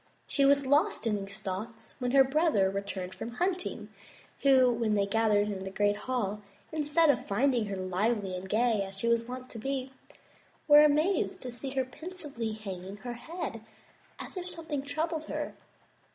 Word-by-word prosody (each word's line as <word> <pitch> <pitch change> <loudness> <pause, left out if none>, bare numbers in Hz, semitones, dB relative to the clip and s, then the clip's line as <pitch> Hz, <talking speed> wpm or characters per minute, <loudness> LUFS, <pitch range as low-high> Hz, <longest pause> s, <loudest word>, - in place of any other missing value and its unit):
She 280 - +2
was 280 0 +4
lost 295 - +2
in 220 -2 +2
these 195 +1 -9
thoughts 215 +3 -6
when 250 -1 -1
her 270 +1 +7
brothers 265 - +2
returned 195 -2 -4
from 235 - -6
hunting, 350 - -2 0.5
who, 260 -3 +6
when 225 -2 +1
they 200 -1 +2
entered 205 -2 +1
the 190 - -4
great 205 +1 +1
hall, 210 -3 -2 0.3
instead 310 0 +3
of 245 - -4
finding 240 +1 +2
her 200 - -3
lively 190 +2 -1
and 185 +1 -6
gay 225 0 +2
as 195 0 -6
she 235 - -2
was 235 0 +2
wont 255 +1 -6
to 230 - -7
be, 265 +2 -3 0.7
were 295 0 +9
amazed 305 +5 +2
to 250 - -5
see 240 +3 -4
her 265 -1 +1
pensively 290 -6 -6
hanging 195 -2 -7
her 245 +3 -6
head 295 -2 -6 0.6
as - - -9
if 365 -1 -4
something 325 -5 -4
troubled 315 +3 -2
her. - - -4
240 Hz, 170 wpm, -30 LUFS, 205-285 Hz, 0.7 s, were